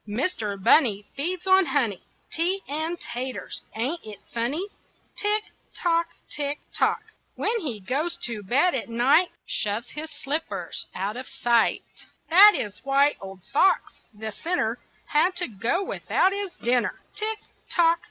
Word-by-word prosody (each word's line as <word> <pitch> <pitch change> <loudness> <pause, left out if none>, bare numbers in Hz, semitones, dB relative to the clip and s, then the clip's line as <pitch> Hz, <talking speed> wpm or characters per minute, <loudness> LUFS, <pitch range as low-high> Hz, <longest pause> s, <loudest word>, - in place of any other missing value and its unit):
Mister 215 - -1
Bunny 210 0 +4
feeds 350 +6 -1
on 380 -2 +5
honey, 235 -10 0 0.3
Tea, 365 +4 0
and 315 +4 -2
taters 240 -5 -4
ain't 265 +10 -1
it 215 -2 -9 0.2
funny? 250 +10 -1 0.5
Tick, 420 +1 +1 0.3
tock! 335 -1 +1 0.2
Tick, 290 0 -3 0.2
tock! - - +1 0.3
When 460 +1 0
he 265 - -3
goes 275 - -1
to 230 -3 -3
bed 270 - +2
at 250 - -3
night, 265 +10 +4 0.2
Shoves 210 +4 -1
his 310 +1 -5
slippers 300 +3 -2
out 200 +4 -2
of 255 - -6
sight; 235 -2 +2 0.5
That 405 +5 +10
is 210 -1 -4
why 275 +2 +3
Old 190 -2 -9
Fox, 375 +7 +2
the 220 0 -6
sinner, 345 - -1 0.3
Had 350 +5 +2
to - - 0
go 230 - -1
without 380 0 +1
his 400 -2 -4
dinner. 245 +1 0
Tick, 435 +1 -2 0.3
tock! 335 -1 +4
285 Hz, 140 wpm, -25 LUFS, 230-350 Hz, 0.5 s, That